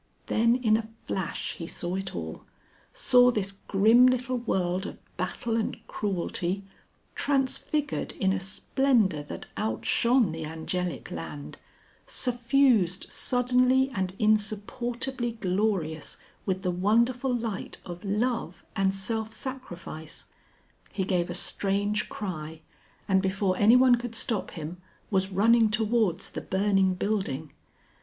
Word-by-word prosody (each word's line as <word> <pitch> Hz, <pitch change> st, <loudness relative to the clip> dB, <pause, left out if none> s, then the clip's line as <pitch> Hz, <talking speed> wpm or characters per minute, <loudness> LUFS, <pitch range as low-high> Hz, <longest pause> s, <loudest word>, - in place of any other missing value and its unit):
Then 230 Hz, +2 st, +3 dB
in 225 Hz, -4 st, +3 dB
a 220 Hz, -1 st, -5 dB, 0.2 s
flash 190 Hz, -4 st, -3 dB
he 165 Hz, -, -6 dB
saw 175 Hz, +1 st, -3 dB
it 195 Hz, 0 st, -3 dB
all, 80 Hz, -2 st, -6 dB, 0.5 s
saw 250 Hz, -1 st, +5 dB
this 205 Hz, -5 st, -1 dB
grim 215 Hz, +5 st, +4 dB
little 255 Hz, 0 st, +1 dB
world 185 Hz, -4 st, -1 dB
of -, -, -8 dB, 0.2 s
battle 230 Hz, -2 st, -2 dB
and 225 Hz, -1 st, -1 dB
cruelty, 190 Hz, -1 st, -2 dB, 0.5 s
transfigured 285 Hz, +1 st, 0 dB
in 190 Hz, -1 st, +1 dB
a 195 Hz, -, -1 dB
splendour 205 Hz, -, +1 dB
that 145 Hz, -, -8 dB
outshone 235 Hz, 0 st, +2 dB
the 160 Hz, 0 st, -5 dB
Angelic 160 Hz, 0 st, -3 dB
Land, 75 Hz, -3 st, -7 dB, 0.5 s
suffused 240 Hz, -6 st, +2 dB
suddenly 255 Hz, +1 st, +3 dB
and 190 Hz, -1 st, -2 dB
insupportably 235 Hz, +4 st, 0 dB
glorious 185 Hz, -6 st, -1 dB, 0.3 s
with 190 Hz, 0 st, -1 dB
the 180 Hz, -, +1 dB
wonderful 235 Hz, +8 st, +2 dB
light 225 Hz, -4 st, -4 dB
of 175 Hz, -1 st, -8 dB
Love 210 Hz, -2 st, -1 dB
and 195 Hz, 0 st, +1 dB
Self 220 Hz, +3 st, -2 dB
Sacrifice. 180 Hz, -, -7 dB, 0.7 s
He 195 Hz, -, -1 dB
gave 180 Hz, -2 st, 0 dB
a 175 Hz, -, -3 dB
strange 205 Hz, +2 st, 0 dB
cry, 160 Hz, -6 st, -5 dB, 0.5 s
and 190 Hz, -1 st, +3 dB
before 190 Hz, 0 st, 0 dB
anyone 245 Hz, +5 st, +6 dB
could 240 Hz, -1 st, -1 dB
stop 225 Hz, -3 st, -1 dB
him, 165 Hz, +2 st, -7 dB, 0.3 s
was 190 Hz, 0 st, +1 dB
running 225 Hz, +4 st, +4 dB
towards 215 Hz, -4 st, 0 dB
the -, -, -5 dB
burning 195 Hz, -1 st, +2 dB
building. 185 Hz, -8 st, -2 dB
205 Hz, 120 wpm, -27 LUFS, 185-235 Hz, 0.7 s, anyone